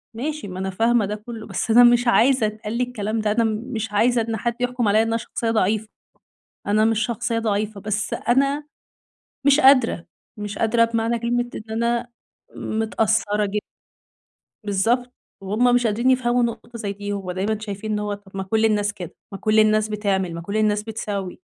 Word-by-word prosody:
ماشي 295 Hz, -1 st, -4 dB
ما 185 Hz, 0 st, -7 dB
أنا 190 Hz, 0 st, -2 dB
فاهمة 225 Hz, +2 st, +2 dB
ده 210 Hz, +1 st, -3 dB
كلّه، 220 Hz, +1 st, -9 dB
بس 225 Hz, -, -2 dB
أنا 245 Hz, +2 st, +8 dB
مش 240 Hz, 0 st, +5 dB
عايزة 250 Hz, 0 st, +4 dB
يتقال 215 Hz, +1 st, -4 dB
لي 250 Hz, -, +2 dB
الكلام 225 Hz, -3 st, -3 dB
ده، 210 Hz, -1 st, 0 dB
أنا 230 Hz, +2 st, +2 dB
مش 220 Hz, 0 st, -3 dB
عايزة 235 Hz, +3 st, +3 dB
إن 225 Hz, 0 st, -2 dB
حد 235 Hz, +2 st, -2 dB
يحكُم 245 Hz, -2 st, 0 dB
عليَّ 215 Hz, +2 st, +4 dB
إن 225 Hz, -, 0 dB
أنا 225 Hz, 0 st, 0 dB
شخصية 230 Hz, 0 st, -3 dB
ضعيفة، 215 Hz, 0 st, +1 dB, 0.8 s
أنا 215 Hz, +1 st, +3 dB
مش 225 Hz, -1 st, +2 dB
شخصية 235 Hz, 0 st, -2 dB
ضعيفة 210 Hz, -2 st, -2 dB
بس 210 Hz, 0 st, -2 dB
أنا 275 Hz, +5 st, +1 dB, 0.8 s
مش 280 Hz, +2 st, +6 dB
قادرة، 255 Hz, -10 st, +4 dB, 0.3 s
مش 205 Hz, 0 st, -5 dB
قادرة 230 Hz, +1 st, +3 dB
بمعنى 230 Hz, 0 st, 0 dB
كلمة 240 Hz, +1 st, -1 dB
إن 220 Hz, +1 st, -8 dB
أنا 235 Hz, +1 st, 0 dB, 0.5 s
متأثّرة 220 Hz, -1 st, 0 dB
ج 200 Hz, +2 st, -4 dB, 1.1 s
بالضبط، 235 Hz, +5 st, 0 dB, 0.3 s
وهُم 235 Hz, +6 st, +2 dB
مش 245 Hz, -2 st, +2 dB
قادرين 235 Hz, +5 st, +1 dB
يفهموا 245 Hz, -1 st, +2 dB
نقطة 235 Hz, +1 st, -4 dB
زي 200 Hz, -2 st, -3 dB
دي، 205 Hz, 0 st, -5 dB
هو 190 Hz, -2 st, -4 dB
دايمًا 205 Hz, +4 st, -1 dB
شايفين 215 Hz, 0 st, -5 dB
إن 210 Hz, -, 0 dB
هو 210 Hz, 0 st, -2 dB
طَب 195 Hz, -1 st, -10 dB
ما 190 Hz, -, -2 dB
كلّ 220 Hz, +3 st, +1 dB
الناس 205 Hz, -1 st, +1 dB
كده، 180 Hz, -5 st, -9 dB, 0.2 s
ما 195 Hz, -, -6 dB
كلّ 215 Hz, +1 st, +2 dB
الناس 215 Hz, 0 st, +3 dB
بتعمل، 195 Hz, -4 st, -1 dB
ما 170 Hz, -, -6 dB
كلّ 200 Hz, +5 st, -3 dB
الناس 210 Hz, -1 st, +1 dB
بتسوّي، 205 Hz, -4 st, -5 dB
220 Hz, 185 wpm, -22 LUFS, 205-235 Hz, 1.1 s, أنا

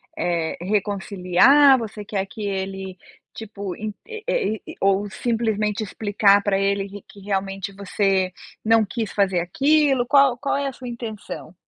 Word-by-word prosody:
eh, 170 Hz, -2 st, -1 dB
reconciliar, 205 Hz, +7 st, +4 dB
você 215 Hz, -2 st, -7 dB
quer 195 Hz, -2 st, -2 dB
que 215 Hz, +1 st, -8 dB
ele, 190 Hz, -1 st, -4 dB, 0.4 s
tipo, 200 Hz, -4 st, -7 dB
en 215 Hz, 0 st, -5 dB
e 450 Hz, -, -2 dB
e -, -, -8 dB
ou 195 Hz, +1 st, +1 dB
simplesmente 220 Hz, -2 st, -1 dB
explicar 205 Hz, 0 st, +2 dB
para 195 Hz, -1 st, +1 dB
ele 195 Hz, 0 st, 0 dB
q 200 Hz, +1 st, -10 dB
que 200 Hz, -, -14 dB
realmente 195 Hz, 0 st, -3 dB
você 195 Hz, -1 st, 0 dB, 0.3 s
não 225 Hz, 0 st, +4 dB
quis 220 Hz, +1 st, -4 dB
fazer 195 Hz, -3 st, +1 dB
aquilo, 275 Hz, -, +2 dB
qual 275 Hz, -2 st, +4 dB
qual 275 Hz, +2 st, -1 dB
é 280 Hz, 0 st, -1 dB
a 270 Hz, -, -4 dB
sua 250 Hz, 0 st, -9 dB
intenção? 220 Hz, -7 st, -7 dB
205 Hz, 150 wpm, -22 LUFS, 195-235 Hz, 0.4 s, reconciliar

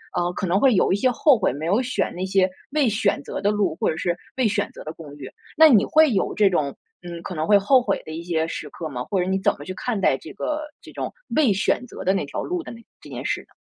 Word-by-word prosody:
呃， 175 Hz, 0 st, 0 dB
可 185 Hz, -, -3 dB
能 180 Hz, +3 st, +2 dB
会 260 Hz, +1 st, +4 dB
有 185 Hz, -, +3 dB
一 -, -, +3 dB
些 255 Hz, +4 st, +2 dB
后 265 Hz, +1 st, +4 dB
悔， 210 Hz, -, +1 dB
没 145 Hz, +5 st, -5 dB
有 200 Hz, +8 st, +2 dB
选 255 Hz, 0 st, -2 dB
那 185 Hz, +2 st, -3 dB
些 190 Hz, 0 st, +2 dB, 0.2 s
未 295 Hz, -4 st, +2 dB
选 210 Hz, -6 st, +1 dB
择 -, -, -5 dB
的 205 Hz, +1 st, +2 dB
路， 200 Hz, -6 st, 0 dB
或 -, -, 0 dB
者 155 Hz, -, -5 dB
是 175 Hz, 0 st, -1 dB, 0.2 s
未 250 Hz, -4 st, +3 dB
选 205 Hz, -1 st, -1 dB
择 -, -, -11 dB
的 155 Hz, -, -5 dB
公 155 Hz, -4 st, -11 dB
寓。 130 Hz, -2 st, -8 dB, 0.3 s
那 320 Hz, -, +9 dB
你 225 Hz, -8 st, +6 dB
会 310 Hz, -3 st, +4 dB
有 195 Hz, -, 0 dB
这 205 Hz, -2 st, +4 dB
种， 145 Hz, -6 st, -1 dB, 0.3 s
嗯， 170 Hz, -1 st, -7 dB
可 180 Hz, -, -6 dB
能 155 Hz, +1 st, -1 dB
会 205 Hz, +2 st, +6 dB
后 255 Hz, +6 st, +4 dB
悔 245 Hz, -, -1 dB
的 155 Hz, -, -7 dB
一 165 Hz, +2 st, -6 dB
些 165 Hz, -2 st, -1 dB
时 150 Hz, -2 st, -6 dB
刻 160 Hz, +2 st, -6 dB
吗， 125 Hz, -3 st, -4 dB
或 190 Hz, +7 st, -2 dB
者 180 Hz, -, -1 dB
你 190 Hz, -, +1 dB
怎 -, -, +3 dB
么 145 Hz, -, -9 dB
去 185 Hz, -, -5 dB
看 225 Hz, +1 st, -3 dB
待 135 Hz, -, +2 dB
这 155 Hz, -, -11 dB
个 300 Hz, +9 st, -3 dB, 0.2 s
这 -, -, -13 dB
种 -, -, -5 dB, 0.2 s
未 295 Hz, -8 st, +4 dB
选 195 Hz, +5 st, 0 dB
择 -, -, -9 dB
的 190 Hz, -, +3 dB
那 195 Hz, -, -1 dB
条 140 Hz, -, -5 dB
路 355 Hz, -1 st, -3 dB
的 -, -, -9 dB
那 230 Hz, -, -11 dB, 0.2 s
这 -, -, -13 dB
件 -, -, -7 dB
事 -, -, -1 dB
呢？ -, -, -23 dB
195 Hz, 315 characters per minute, -23 LUFS, 165-235 Hz, 0.3 s, 那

